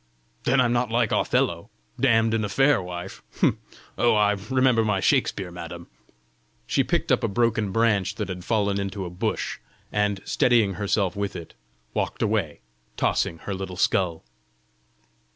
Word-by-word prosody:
"Then 130 +2 +3
I'm 120 -2 +3
not 120 -1 +1
like 115 -1 +1
Othello, - - 0 0.3
damned 115 -4 +3
in 110 -1 +1
a 105 - -2
fair 135 +2 +3
wife! 90 +1 -7 0.8
Oh, 120 - +4
I 105 -1 +4 0.2
remember 130 -3 +3
my 105 -3 +1
Shakspeare, 95 -1 +1
madam!" 85 0 -8 0.8
She - - +1
picked - - -1
up - - +2
a - - +2
broken 110 -2 +1
branch 110 -3 +1
that - - -3
had 90 -2 -6
fallen 100 -2 0
into 100 -1 -4
a 85 - -6
bush, 90 - -3 0.3
and 105 -1 0
steadying 115 -5 +3
herself 100 0 0
with 100 -1 -3
it, 85 -3 -8 0.4
walked - - -2
away, 105 - -1 0.4
tossing 85 - 0
her 100 - -3
little 95 -1 -6
skull. 90 -3 +1
100 Hz, 150 wpm, -25 LUFS, 95-115 Hz, 0.8 s, Oh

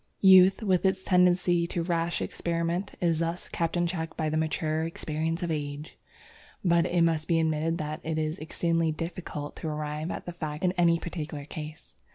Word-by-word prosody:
Youth, 190 +1 +7
with 185 -4 +2
its 190 -1 +1
tendency 180 -2 +3
to 170 0 -2
rash 170 0 -1
experiment, 170 +3 -2
is 165 -3 +2
thus 165 +1 -2
kept 165 +1 -1
in 175 - +2
check 165 -2 -4
by 155 -2 0
the 155 - -2
mature 155 0 0
experience 165 +1 -3
of 170 - -1
age. 145 0 -4 0.7
But 170 0 +4
it 175 -1 +2
must 160 -2 +1
be 165 -2 +3
admitted 160 +1 0
that 155 -1 -4
it 160 0 -2
is 155 +2 -2
exceedingly 165 +1 0
difficult 155 -2 -5
to 160 - -5
arrive 150 +1 -3
at - - -5
the 175 - -5
facts 155 -2 -5
in 180 - +3
any 170 -2 +3
particular 155 -4 -6
case. 155 +1 -8
165 Hz, 185 wpm, -28 LUFS, 155-175 Hz, 0.7 s, Youth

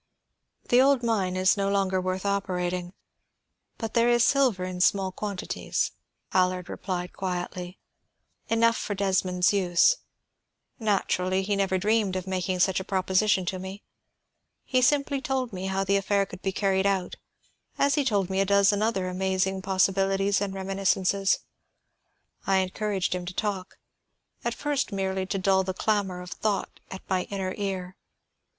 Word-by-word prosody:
"The 245 +1 +6
old 270 -2 +4
mine 200 -6 0
is 185 0 +4
no 195 -1 0
longer 190 -2 +1
worth 185 +1 -3
operating; 180 -2 -1 0.8
but 225 -2 -5
there 235 0 +4
is 240 -1 +4
silver 255 -10 +2
in 185 -1 -4
small 190 0 +3
quantities," 200 0 -3 0.4
Allard 185 -1 +1
replied 180 -2 -4
quietly. 180 0 -4 0.7
"Enough 230 0 +3
for 205 - -3
Desmond's 185 -1 +1
use. 185 - +4 0.8
Naturally, 190 -3 0
he 200 +1 0
never 195 -1 +1
dreamed 205 0 +1
of 185 -1 -3
making 185 -1 -1
such 190 0 +3
a - - -4
proposition 190 0 +1
to 185 +1 -3
me. 190 +2 -8 0.8
He 255 -1 +1
simply 280 +1 +2
told 265 -5 -2
me 185 +1 -4
how 190 0 0
the 200 +1 +2
affair 200 0 +1
could 185 -1 -11
be 195 - -1
carried 195 0 +1
out, 190 -2 -1 0.6
as 280 0 +3
he 290 - +2
told 205 -7 +1
me 190 +1 -1
a - - +4
dozen 200 +1 +3
other 215 -4 0
amazing 190 +1 -1
possibilities 195 +1 +1
and 200 -1 -1
reminiscences. 195 0 +1 1.1
I 195 -1 +4
encouraged 190 +1 -1
him 180 -1 -4
to 180 - -6
talk, 195 -3 -3 0.7
at 235 0 -1
first 290 -2 -1
merely 190 -1 -2
to 195 - -2
dull 190 0 +3
the 185 0 -4
clamor 195 -4 0
of 180 0 -9
thought 210 -2 -2
at 190 - -9
my 185 -1 0
inner 190 -2 -3
ear. 190 -3 -4
195 Hz, 155 wpm, -26 LUFS, 185-205 Hz, 1.1 s, The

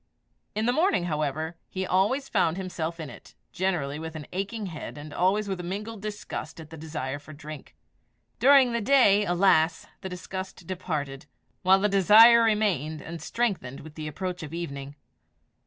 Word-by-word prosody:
In 215 +1 0
the 245 - +2
morning, 320 - +2
however, 155 0 -2
he 190 0 -3
always 205 +10 +1
found 180 -5 +1
himself 170 -3 -4
in 160 - -5
it - - -13 0.2
generally 155 -6 -1
with 160 0 -7
an 155 -2 -6
aching 200 +3 -3
head, 160 -4 -7
and 145 0 -9
always 200 +3 +1
with 190 -2 -3
a - - -5
mingled 205 +4 -5
disgust 205 -6 -6
at 160 0 -11
and 160 - -9
desire 145 -3 -4
for 150 +2 -12
drink. 150 0 -10 0.6
During 265 0 +6
the 235 0 -1
day, 210 -5 +5
alas! 175 -3 +3 0.2
the 190 - -5
disgust 185 0 -7
departed, 150 -7 -4 0.3
while 190 +1 +5
the 205 - +2
desire 215 +4 +7
remained, 200 - +1
and 165 +1 -8
strengthened 195 - -2
with 155 0 -11
the 155 -1 -6
approach 180 +4 -4
of 155 0 -7
evening. 140 -4 -6
180 Hz, 170 wpm, -27 LUFS, 155-205 Hz, 0.6 s, desire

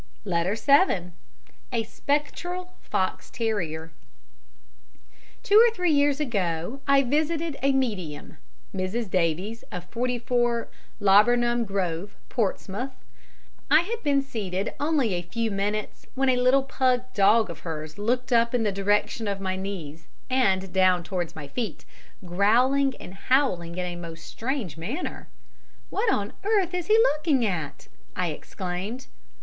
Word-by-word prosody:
Letter 180 +1 0
7 225 - +3 0.6
A 230 -2 0
Spectral 350 +9 -3
Fox 185 -1 -2
terrier 170 -9 -2 1.5
Two 420 +3 +7
or 475 - +5
three 360 -3 +1
years 285 -1 +3
ago 200 - -2
I 275 0 +5
visited 310 +3 0
a 275 - +3
medium 205 - -2 0.4
(Mrs. 190 +3 -2
Davies 185 +6 0
of 180 -1 -5
44 240 0 0 0.3
Laburnum 240 +4 +4
Grove, 195 -1 -2
Portsmouth). 230 +2 -2 0.8
I 310 - +7
had 455 +6 -4
been 280 -2 +2
seated 200 -7 -3
only 290 - +1
a 175 - -1
few 225 +6 -2
minutes 205 +2 -3
when 270 0 +2
a 255 - +4
little 255 +2 +4
pug 255 -2 +1
dog 210 0 +4
of - - -9
hers 155 0 -6
looked 245 +4 0
up 235 +1 +3
in 235 - +2
the 210 - +1
direction 205 +3 0
of 200 -1 -2
my 190 -1 -2
knees 165 -5 -6 0.2
and 195 -8 +2
down 185 -2 +4
towards 175 -2 -3
my 150 -3 -7
feet, 210 - -4 0.4
growling 250 +9 +3
and 180 - -9
howling 195 -6 +1
in 180 - -1
a 175 -1 -4
most 165 -1 -8
strange 235 - -4
manner. 230 - -5 0.6
"What 430 +1 +1
on 205 - -1
earth 395 -4 +2
is 355 -2 -2
he 435 - +6
looking 305 - +3
at?" 165 -8 -3 0.3
I 180 -2 0
exclaimed. 185 - -5
225 Hz, 135 wpm, -26 LUFS, 185-270 Hz, 1.5 s, Two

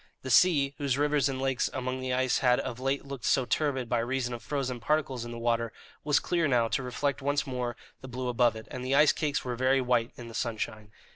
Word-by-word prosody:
The 130 - -3
sea, 140 -4 +5
whose 140 -3 0
rivers 145 -1 +2
and 130 -1 -3
lakes 135 -1 0
among 130 0 -3
the 130 0 -3
ice 130 0 +1
had 125 -2 +3
of 125 -2 -4
late 135 +2 -1
looked 140 -3 -7
so 130 - +2
turbid 135 -3 0
by 120 0 +1
reason 125 +1 -1
of 120 - -6
frozen 130 -2 -3
particles 135 -2 0
in - - -7
the 120 - -6
water, 115 -1 0 0.3
was 150 -1 +3
clear 170 -3 0
now 120 -4 +3
to - - 0
reflect 135 +3 -2
once 145 +1 0
more 125 -2 -3 0.3
the 130 - -8
blue 125 0 -4
above 120 -2 +2
it, 110 - -9
and 125 - -5
the 130 +2 +1
ice 150 +1 +6
cakes 150 -4 -2
were 125 -1 -2
very 130 +2 +3
white 125 -2 +1
in 120 - -9
the 115 - -10
sunshine. 110 -3 -3
130 Hz, 235 wpm, -29 LUFS, 120-140 Hz, 0.3 s, ice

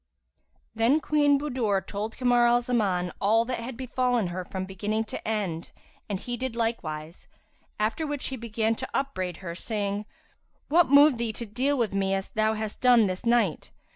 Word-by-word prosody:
"[FN#354] - - -46
Then 230 +7 +3
Queen 290 -2 +3
Budur 235 -9 -1
told 210 +3 -5
Kamar 245 -1 +4
al 240 0 +4
Zaman 200 -8 0
all 225 +3 +3
that 250 0 -3
had 235 +1 -6
befallen 250 -5 0
her 180 +1 -4
from 185 +1 -5
beginning 210 +4 -2
to 220 - -7
end 195 -7 -2 0.4
and 200 -2 -2
he 245 +4 -4
did 260 -2 -4
likewise; 170 -9 -3 0.5
after 225 +9 0
which 290 -2 -3
he 265 - -4
began 225 -2 -1
to 260 +3 -6
upbraid 185 -11 -2
her, 170 - -4
saying, 205 +2 -3 0.6
"What 335 +1 +4
moved 285 -2 +6
thee 230 -2 -1
to 235 - -3
deal 255 +7 0
with 230 -5 0
me 195 -1 +1
as 195 0 -4
thou 220 0 +1
hast 215 -1 -5
done 245 -3 +6
this 185 +3 -3
night?" 230 -9 +2
225 Hz, 180 wpm, -27 LUFS, 195-250 Hz, 0.6 s, moved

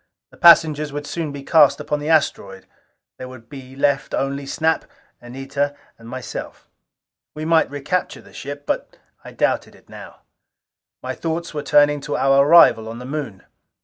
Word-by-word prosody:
The - - -19
passengers 155 -4 +5 0.2
soon 170 -1 -3
would 145 - -7
be 140 -1 -8
cast 150 -1 +4
upon 150 - -3
the 150 +2 -5
asteroid: 100 -11 0 0.5
there 130 - -7
would 125 -2 -13
be 135 -2 -11
left 140 0 0
only 140 0 -3
Snap, 160 +3 0 0.4
Anita 135 +3 -4 0.2
and 115 0 -13
myself. 130 0 -8 0.7
We 155 +1 -5
might 165 0 +3
recapture 145 +6 -3
the - - -18
ship, 145 +1 -8
but - - -4 0.3
I - - -11
doubted - - -1
it - - -23
now. - - -12 0.8
My - - -4
thoughts 165 +1 -4
were 150 - -3
turning 145 0 +3
to - - -3
our 135 0 +4
arrival 115 -9 +6
on 115 - -8
the 125 - -9
Moon. 135 -9 -6
145 Hz, 165 wpm, -20 LUFS, 130-155 Hz, 0.8 s, arrival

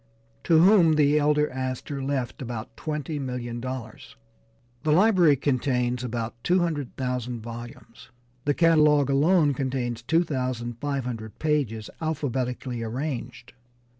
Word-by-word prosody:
to 165 - +4
whom 175 -1 +6
the 150 0 +4
elder 150 0 +3
Astor 130 +2 -4
left 135 -2 -3
about 120 -3 -6
$20,000,000. 130 -6 -5 0.7
The 155 - 0
library 180 -3 +5
contains 125 -2 0
about 120 -1 -3
two 180 - +3
hundred 160 -7 -2
thousand 125 -2 -3
volumes, 115 0 -10 0.4
the 145 0 +2
catalogue 150 -4 +4
alone 150 +1 +4
contains 125 -3 -2
two 165 +8 +2
thousand 125 -5 -3
five 140 -2 -2
hundred 110 -3 -6
pages 135 -9 -1
alphabetically 130 -5 -2
arranged. 125 +1 -5
130 Hz, 115 wpm, -26 LUFS, 120-150 Hz, 0.7 s, whom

